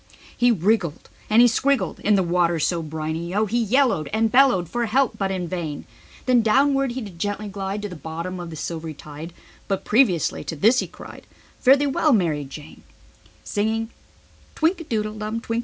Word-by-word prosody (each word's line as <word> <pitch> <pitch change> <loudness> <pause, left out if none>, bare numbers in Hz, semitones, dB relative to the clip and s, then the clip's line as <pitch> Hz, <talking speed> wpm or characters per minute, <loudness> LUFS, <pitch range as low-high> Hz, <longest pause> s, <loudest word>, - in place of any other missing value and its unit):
He 245 - +3
wriggled 195 -5 0 0.2
and 235 +3 +6
scriggled 270 +3 0
in 210 0 +2
the 190 - +2
water, 170 -1 +1
so 170 +2 0
briny 160 +3 -4
O. 215 +1 +2
He 235 +3 0
yellowed 225 - +2
and 220 0 +1
bellowed 250 -10 +4
for 240 +6 -2
help 260 +3 +1
but 195 -1 0
in 185 -2 -3
vain. 165 -4 -5 0.4
Then 250 -2 +4
downward 270 +3 +2
he 260 - -4
did 195 -6 -9
gently 205 +2 -3
glide 195 +1 -4
to - - -2
the 180 - -8
bottom 170 +3 -6
of 175 -1 -6
the 160 - -8
silvery 160 0 -5
tide; 150 +3 -9 0.4
But 195 -2 -2
previously 210 - +2
to 165 - -4
this 225 - +4
he - - -2
cried: - - -12 0.3
"Fare 265 +2 +6
the 290 - 0
well 285 +1 +2
Mar 175 -8 +2
i 145 - -4
Jane." 150 +3 -11
195 Hz, 170 wpm, -23 LUFS, 165-240 Hz, 0.4 s, and